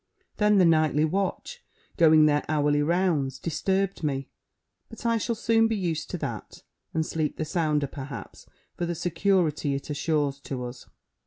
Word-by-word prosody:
Then 210 Hz, -1 st, +4 dB
the 185 Hz, -, +6 dB
nightly 155 Hz, -2 st, +3 dB
watch, 195 Hz, -, -3 dB, 0.3 s
going 155 Hz, -2 st, +6 dB
their 150 Hz, -1 st, +2 dB
hourly 145 Hz, -1 st, +2 dB
rounds, 155 Hz, -5 st, +1 dB
disturbed 190 Hz, +5 st, -1 dB
me. 135 Hz, -3 st, -2 dB, 0.6 s
But 225 Hz, +1 st, -11 dB
I 230 Hz, -1 st, +2 dB
shall 235 Hz, +2 st, -1 dB
soon 225 Hz, 0 st, +3 dB
be 225 Hz, -, -1 dB
used 170 Hz, -6 st, -2 dB
to -, -, -3 dB
that, -, -, -6 dB, 0.3 s
and 160 Hz, -1 st, 0 dB
sleep 155 Hz, -2 st, -2 dB
the 155 Hz, -, -2 dB
sounder, 155 Hz, -3 st, 0 dB
perhaps, 135 Hz, -2 st, -8 dB, 0.3 s
for 175 Hz, -, -2 dB
the 170 Hz, -, -2 dB
security 170 Hz, -4 st, +1 dB
it 140 Hz, +2 st, -5 dB
assures 145 Hz, -2 st, 0 dB
to 130 Hz, -2 st, -5 dB
us. 120 Hz, +1 st, -9 dB
160 Hz, 160 wpm, -26 LUFS, 145-190 Hz, 0.6 s, the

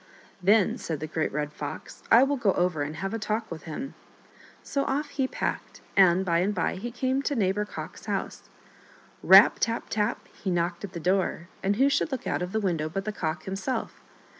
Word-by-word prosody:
" -, -, -29 dB
Then," 215 Hz, -3 st, +3 dB
said 160 Hz, -3 st, -4 dB
the 155 Hz, -, -4 dB
Great 155 Hz, 0 st, -2 dB
Red 150 Hz, 0 st, -3 dB
Fox, 145 Hz, -1 st, -7 dB
" -, -, -27 dB
I 235 Hz, +3 st, +8 dB
will 280 Hz, +1 st, +1 dB
go 215 Hz, -7 st, +2 dB
over 175 Hz, -4 st, 0 dB
and 145 Hz, +2 st, -3 dB
have 195 Hz, +5 st, -4 dB
a 225 Hz, -, -2 dB
talk 220 Hz, 0 st, -2 dB
with 165 Hz, -, -7 dB
him." 255 Hz, -, -6 dB, 0.7 s
So 275 Hz, -, -1 dB
off 290 Hz, +3 st, -1 dB
he 265 Hz, -2 st, -1 dB
packed, -, -, -4 dB
and 190 Hz, -1 st, +5 dB
by 170 Hz, -2 st, +2 dB
and 200 Hz, +4 st, 0 dB
by 175 Hz, -, 0 dB
he 235 Hz, +6 st, -4 dB
came 260 Hz, +3 st, -1 dB
to 285 Hz, -, -1 dB
Neighbor 205 Hz, -1 st, +1 dB
Cock's -, -, -8 dB
house. -, -, -4 dB, 0.7 s
Rap! -, -, +8 dB
tap! 230 Hz, 0 st, -1 dB
tap! 210 Hz, -1 st, -1 dB
he 195 Hz, -, -6 dB
knocked 175 Hz, 0 st, -1 dB
at 195 Hz, -2 st, -6 dB
the 170 Hz, -, -5 dB
door, 180 Hz, -1 st, 0 dB
and 200 Hz, +1 st, +1 dB
who 265 Hz, +5 st, +4 dB
should 280 Hz, +2 st, +1 dB
look 265 Hz, -, -4 dB
out -, -, -1 dB
of 180 Hz, +1 st, -3 dB
the 220 Hz, -, 0 dB
window 170 Hz, -6 st, -1 dB
but 195 Hz, +4 st, -4 dB
the 215 Hz, -, -1 dB
Cock 165 Hz, -4 st, -3 dB
himself. 195 Hz, +7 st, -4 dB
195 Hz, 215 wpm, -27 LUFS, 170-230 Hz, 0.7 s, I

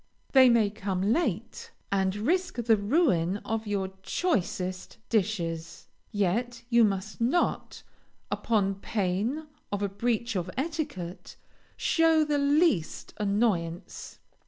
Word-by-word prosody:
They 260 Hz, -2 st, +7 dB
may 225 Hz, -4 st, +3 dB
come 200 Hz, -1 st, -1 dB
late, 235 Hz, -, -2 dB, 0.2 s
and 190 Hz, -1 st, +1 dB
risk 360 Hz, -, 0 dB
the 235 Hz, -2 st, +3 dB
ruin 205 Hz, -, +2 dB
of 225 Hz, 0 st, -2 dB
your 195 Hz, -2 st, -1 dB
choicest 185 Hz, -, -2 dB
dishes, 175 Hz, -7 st, -2 dB, 0.2 s
yet 230 Hz, +5 st, -1 dB
you 235 Hz, 0 st, +6 dB
must 205 Hz, +1 st, -1 dB
not, 270 Hz, +10 st, 0 dB, 0.5 s
upon 195 Hz, -4 st, 0 dB
pain 210 Hz, +10 st, -1 dB, 0.3 s
of 205 Hz, 0 st, -2 dB
a 200 Hz, -, 0 dB
breach 230 Hz, +2 st, -1 dB
of 180 Hz, -1 st, -2 dB
etiquette, 270 Hz, -, -4 dB, 0.4 s
show 325 Hz, -1 st, +3 dB
the 295 Hz, -1 st, +1 dB
least 285 Hz, -, +1 dB
annoyance. 200 Hz, -5 st, -1 dB
215 Hz, 110 wpm, -28 LUFS, 190-250 Hz, 0.5 s, They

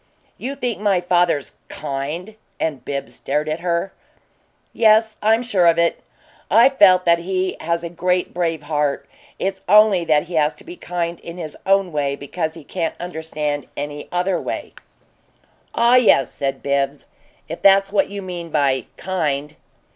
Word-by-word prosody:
"You 270 Hz, +3 st, -4 dB
think 245 Hz, -7 st, -3 dB
my 200 Hz, -3 st, +2 dB
father's 175 Hz, -5 st, +1 dB
KIND?" 150 Hz, +8 st, -5 dB, 0.2 s
And 150 Hz, -5 st, -2 dB
Bibbs 140 Hz, -1 st, -5 dB
stared 150 Hz, +2 st, -2 dB
at 155 Hz, +2 st, -2 dB
her. 175 Hz, +2 st, -1 dB, 0.8 s
"Yes. 220 Hz, -1 st, +3 dB
I'm 225 Hz, +3 st, +3 dB
sure 195 Hz, -8 st, +2 dB
of 165 Hz, 0 st, +4 dB
it. 170 Hz, 0 st, +1 dB, 0.5 s
I've 245 Hz, +6 st, +5 dB
felt 185 Hz, -2 st, +6 dB
that 170 Hz, 0 st, +4 dB
he 185 Hz, +1 st, -2 dB
has 170 Hz, +1 st, -2 dB
a -, -, -3 dB
great, 180 Hz, +1 st, -1 dB
brave 165 Hz, -3 st, -1 dB
heart. 145 Hz, -1 st, -1 dB, 0.3 s
It's 190 Hz, 0 st, -3 dB
only 210 Hz, -3 st, +6 dB
that 150 Hz, -2 st, +3 dB
he 175 Hz, -, -11 dB
has 155 Hz, -1 st, +2 dB
to -, -, -13 dB
be 350 Hz, +1 st, -10 dB
kind 175 Hz, -, -4 dB
in 170 Hz, +1 st, -9 dB
his 160 Hz, -4 st, -6 dB
own 195 Hz, -2 st, +3 dB
way 140 Hz, -2 st, -1 dB
because 160 Hz, +3 st, -4 dB
he 165 Hz, -, -11 dB
can't 165 Hz, +2 st, -3 dB
understand 155 Hz, -4 st, -4 dB
any 145 Hz, 0 st, -5 dB
other 180 Hz, +1 st, 0 dB
way." -, -, -5 dB, 1.0 s
"Ah 235 Hz, +2 st, +5 dB
yes," 205 Hz, -, +4 dB
said 135 Hz, -1 st, -3 dB
Bibbs. 140 Hz, 0 st, -1 dB, 0.4 s
"If 165 Hz, -, -7 dB
that's 195 Hz, 0 st, +5 dB
what 205 Hz, -, +2 dB
you 200 Hz, 0 st, -6 dB
mean 175 Hz, -2 st, -6 dB
by 140 Hz, -4 st, +1 dB
'kind'!" 150 Hz, -5 st, -2 dB
170 Hz, 160 wpm, -20 LUFS, 150-195 Hz, 1.0 s, felt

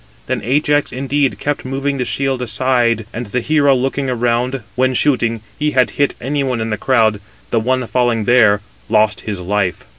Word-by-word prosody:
Then -, -, -2 dB
Ajax, 145 Hz, +4 st, +1 dB
indeed, 135 Hz, +1 st, 0 dB
kept 145 Hz, 0 st, -2 dB
moving 135 Hz, +1 st, -2 dB
the 125 Hz, -, 0 dB
shield 135 Hz, 0 st, -1 dB
aside, 120 Hz, -2 st, +1 dB
and 120 Hz, 0 st, -5 dB
the 125 Hz, +5 st, -1 dB
hero 145 Hz, +1 st, +3 dB
looking 135 Hz, +1 st, -1 dB
around, 125 Hz, +1 st, 0 dB
when 130 Hz, +1 st, +1 dB
shooting, 120 Hz, -5 st, +1 dB, 0.2 s
he 150 Hz, 0 st, +1 dB
had 130 Hz, -, +4 dB
hit 140 Hz, -1 st, 0 dB
any 140 Hz, +3 st, -1 dB
one 130 Hz, -3 st, -1 dB
in 110 Hz, 0 st, -3 dB
the -, -, +1 dB
crowd, 110 Hz, -4 st, +2 dB, 0.3 s
the 115 Hz, -, +2 dB
one 130 Hz, +3 st, 0 dB
278 120 Hz, -, -7 dB
falling 120 Hz, -3 st, +1 dB
there, 110 Hz, -4 st, +4 dB, 0.3 s
lost 105 Hz, -1 st, +2 dB
his 105 Hz, -3 st, -5 dB
life. 95 Hz, 0 st, -1 dB
125 Hz, 185 wpm, -17 LUFS, 115-135 Hz, 0.3 s, had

